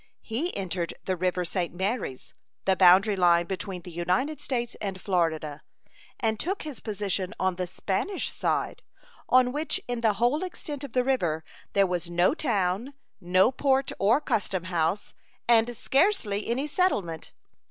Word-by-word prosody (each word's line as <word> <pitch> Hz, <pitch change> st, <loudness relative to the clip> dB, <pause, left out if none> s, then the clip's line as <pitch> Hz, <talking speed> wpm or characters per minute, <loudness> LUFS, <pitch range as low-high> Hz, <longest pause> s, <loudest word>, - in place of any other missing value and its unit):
He 275 Hz, +11 st, -2 dB
entered 180 Hz, -3 st, -3 dB
the 185 Hz, -, 0 dB
river 180 Hz, 0 st, 0 dB
St. 175 Hz, 0 st, -2 dB
Marys, 190 Hz, -, -3 dB, 0.3 s
the 190 Hz, -, +4 dB
boundary 190 Hz, +3 st, +6 dB
line 175 Hz, -2 st, +4 dB
between 185 Hz, -1 st, -5 dB
the 180 Hz, -, -9 dB
United 180 Hz, -, -1 dB
States 240 Hz, -3 st, -2 dB
and 195 Hz, -2 st, -3 dB
Florida, 160 Hz, -6 st, -1 dB, 0.6 s
and 220 Hz, -2 st, 0 dB
took 385 Hz, +4 st, -2 dB
his 300 Hz, -4 st, -7 dB
position 200 Hz, -2 st, -2 dB
on 185 Hz, -1 st, +1 dB
the 180 Hz, 0 st, -3 dB
Spanish 200 Hz, -, -2 dB
side, -, -, -1 dB, 0.5 s
on 255 Hz, -1 st, +5 dB
which 300 Hz, +4 st, -1 dB
in 245 Hz, -1 st, -2 dB
the 220 Hz, -2 st, +3 dB
whole 245 Hz, -, +1 dB
extent 295 Hz, -5 st, -6 dB
of 275 Hz, -, -7 dB
the 250 Hz, -, +3 dB
river 175 Hz, -12 st, 0 dB, 0.3 s
there 200 Hz, 0 st, +4 dB
was 180 Hz, -2 st, -2 dB
no 175 Hz, +5 st, +3 dB
town, 225 Hz, -, -1 dB, 0.2 s
no 185 Hz, +5 st, +4 dB
port 270 Hz, 0 st, +1 dB
or 220 Hz, +7 st, +4 dB
custom 210 Hz, -, -1 dB
house, 180 Hz, +2 st, -1 dB, 0.3 s
and 235 Hz, 0 st, +4 dB
scarcely 270 Hz, -, +1 dB
any 255 Hz, +5 st, 0 dB
settlement. 210 Hz, -, 0 dB
200 Hz, 150 wpm, -27 LUFS, 180-255 Hz, 0.6 s, boundary